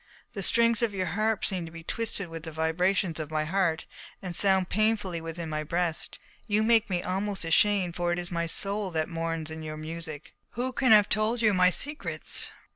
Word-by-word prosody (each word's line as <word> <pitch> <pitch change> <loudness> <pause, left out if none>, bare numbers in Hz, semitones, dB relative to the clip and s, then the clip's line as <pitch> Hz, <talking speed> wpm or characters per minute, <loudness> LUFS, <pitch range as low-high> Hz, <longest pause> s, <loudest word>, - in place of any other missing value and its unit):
The 200 - -4
strings 230 +2 +3
of 225 -4 0
your 185 -1 -1
harp 215 +5 0
seem 185 -3 -2
to - - -10
be 165 0 -10
twisted 220 0 -3
with 165 -1 -7
the 160 0 -7
vibrations 165 +2 0
of 155 -1 -4
my 155 -1 -1
heart 170 -1 0 0.3
and 180 -2 -4
sound 190 -1 +5
painfully 205 -5 0
within 165 +1 -6
my 155 -1 -3
breast. 170 +1 -2 0.3
You 215 0 +2
make 225 -1 +4
me 180 -2 -1
almost 195 0 -2
ashamed, 180 +1 +3
for 175 0 0
it 175 - 0
is 175 0 -5
my 170 -1 -1
soul 200 +3 0
that 160 -2 -2
mourns 165 -1 -3
in 160 0 -6
your 155 -1 -6
music. 155 -1 -7 0.2
Who 250 +2 -2
can 260 -2 +2
have 210 -1 +7
told 220 +2 +1
you 215 -2 +5
my 180 -1 +5
secrets?" 295 - -4
180 Hz, 200 wpm, -28 LUFS, 165-210 Hz, 0.3 s, have